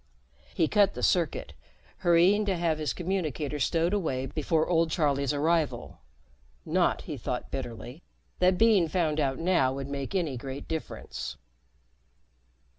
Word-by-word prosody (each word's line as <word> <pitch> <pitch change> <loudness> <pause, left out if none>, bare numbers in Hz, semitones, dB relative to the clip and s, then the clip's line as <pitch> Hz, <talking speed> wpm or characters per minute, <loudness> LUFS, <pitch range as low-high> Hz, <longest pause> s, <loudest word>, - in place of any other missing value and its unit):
He 160 - +3
cut 200 0 +3
the - - -5
circuit, 170 -5 +1 0.4
hurrying 180 +4 +4
to 195 -3 0
have 165 -2 0
his 155 - -1
communicator 160 -5 -2
stowed 165 +6 +1
away 135 -10 -1
before 155 +3 0
old 165 -2 +2
Charlie's 140 -4 +1
arrival 155 - 0 0.7
not, - - +1
he - - -6
thought - - -4
bitterly, 120 +5 -6 0.4
that 180 0 +4
being 215 -6 +4
found 155 -2 0
out 135 -3 0
now 165 -7 +2
would 135 0 -5
make 140 +5 -4
any 160 -9 0
great 135 +3 -7
difference. 160 -1 -5
160 Hz, 135 wpm, -28 LUFS, 140-180 Hz, 0.7 s, hurrying